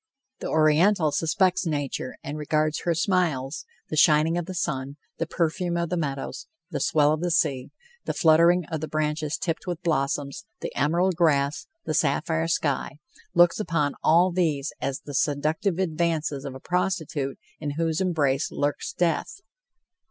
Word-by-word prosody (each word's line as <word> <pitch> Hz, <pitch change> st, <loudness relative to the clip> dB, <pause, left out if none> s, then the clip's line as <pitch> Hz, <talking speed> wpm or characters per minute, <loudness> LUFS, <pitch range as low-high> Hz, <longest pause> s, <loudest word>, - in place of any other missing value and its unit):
The -, -, -4 dB
Oriental 160 Hz, +2 st, +3 dB
suspects 185 Hz, +3 st, +1 dB
nature 145 Hz, -4 st, -3 dB
and 140 Hz, +2 st, -5 dB
regards 155 Hz, 0 st, 0 dB
her 170 Hz, -1 st, +2 dB
smiles 160 Hz, -6 st, 0 dB, 0.2 s
the -, -, -3 dB
shining 155 Hz, +2 st, +4 dB
of 175 Hz, -1 st, -2 dB
the 185 Hz, -, -6 dB
sun, 135 Hz, -4 st, -2 dB, 0.2 s
the 165 Hz, -, -1 dB
perfume 170 Hz, +1 st, -1 dB
of 170 Hz, -1 st, -1 dB
the -, -, +1 dB
meadows, 140 Hz, -5 st, -4 dB, 0.2 s
the -, -, -2 dB
swell 150 Hz, -1 st, +3 dB
of 155 Hz, -, -3 dB
the 175 Hz, -, 0 dB
sea, 135 Hz, -6 st, +1 dB, 0.4 s
the -, -, -1 dB
fluttering 170 Hz, +2 st, +5 dB
of 160 Hz, -2 st, -2 dB
the 155 Hz, -, -3 dB
branches 155 Hz, 0 st, -1 dB
tipped 165 Hz, +1 st, -3 dB
with 175 Hz, 0 st, -4 dB
blossoms, 140 Hz, +1 st, -1 dB, 0.2 s
the -, -, -6 dB
emerald 170 Hz, +5 st, +2 dB
grass, 150 Hz, -4 st, +1 dB, 0.2 s
the -, -, -2 dB
sapphire 160 Hz, +2 st, +1 dB
sky 145 Hz, -5 st, -1 dB, 0.4 s
looks 175 Hz, +2 st, +5 dB
upon 165 Hz, -7 st, 0 dB
all 175 Hz, +3 st, +5 dB
these 155 Hz, -6 st, 0 dB
as 135 Hz, 0 st, -2 dB
the 145 Hz, -, -9 dB
seductive 155 Hz, +6 st, 0 dB
advances 160 Hz, -5 st, -1 dB
of 135 Hz, -2 st, -6 dB
a -, -, -8 dB
prostitute 160 Hz, -5 st, -2 dB, 0.2 s
in 145 Hz, -2 st, -3 dB
whose 165 Hz, +1 st, 0 dB
embrace 150 Hz, -7 st, +1 dB
lurks 145 Hz, 0 st, -2 dB
death! 180 Hz, -, -1 dB
155 Hz, 160 wpm, -25 LUFS, 145-170 Hz, 0.4 s, fluttering